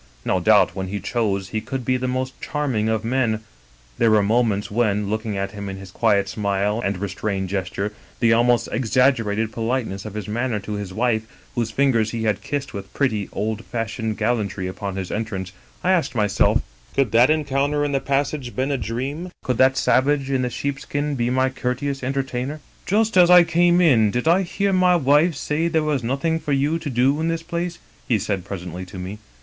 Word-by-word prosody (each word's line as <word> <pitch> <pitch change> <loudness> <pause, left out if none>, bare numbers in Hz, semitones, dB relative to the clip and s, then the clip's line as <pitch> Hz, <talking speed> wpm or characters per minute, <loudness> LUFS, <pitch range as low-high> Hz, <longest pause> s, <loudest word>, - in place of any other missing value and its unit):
No - - +1
doubt - - +4
when 95 0 -3
he 100 +2 -3
chose 100 -3 -1
he 110 - -2
could 130 +3 -5
be 130 - +2
the 130 0 -1
most 130 +1 -2
charming 130 -8 -1
of 110 0 -1
men; 115 -3 +1 0.6
there 115 - +4
were 110 -1 +4
mo 115 +5 +3
ments 105 -4 -1
when, 105 -2 +1
looking 110 -1 -2
at 95 0 -2
him 100 -1 -6
in 95 - -6
his 95 -1 -10
quiet 100 -2 +2
smile 100 +1 -1
and 100 -1 -1
re 100 +2 -3
strained 95 -2 -3
gesture, 100 +2 -3 0.3
the 115 -1 +4
almost 120 0 +3
exaggerated 115 -3 +1
politeness 115 -4 -2
of 110 -1 -8
his 105 -3 -5
manner 115 +1 -1
to 105 - -5
his 100 -2 -4
wife, 110 +1 0 0.3
whose 115 -2 -1
fingers 115 -3 +2
he 115 0 -3
had 105 -2 0
kissed 145 -2 -4
with 100 -1 -7
pretty, 110 -8 0
old 110 +2 -3
fashioned 115 -2 -3
gallantry 105 -5 -1
upon 95 +1 -4
his 95 -2 -4
entrance, 105 -4 -3 0.3
I 185 - +3
asked 175 -8 +1
myself, 105 -2 +2 0.3
Could 135 -6 +2
that 120 +4 +5
encounter 145 -1 +1
in 145 - -1
the 135 - +1
passage 140 +1 -1
have 120 - -11
been 130 +2 0
a 135 - 0
dream? 130 - -4
Could 125 -2 -1
that 130 0 +5
savage 140 +1 +2
in 135 -1 +1
the 125 - 0
sheepskin 145 +3 -3
be 120 -3 0
my 130 +1 +2
courteous 135 +2 -3
enter 135 +1 -1
tainer? 130 +3 -4
" - - -31
* - - -31
Just 215 +1 +2
as 175 -1 +7
I 180 -1 +9
came 175 +1 +3
in, 125 -12 +5
did 125 +8 -2
I 175 +4 +5
hear 195 +2 -1
my 180 -1 +4
wife 150 +2 +3
say 150 +3 -1
there 160 -2 +1
was 150 -5 0
nothing 140 +7 0
for 150 - -2
you 145 +4 +1
to 160 -3 -5
do 130 +4 +2
in 165 - 0
this 165 0 -1
place?' 170 0 -3 0.3
he 115 - +3
said 100 -2 -2
presently 90 -2 -6
to 95 +1 -10
me. 95 +3 -6
120 Hz, 210 wpm, -22 LUFS, 105-140 Hz, 0.6 s, I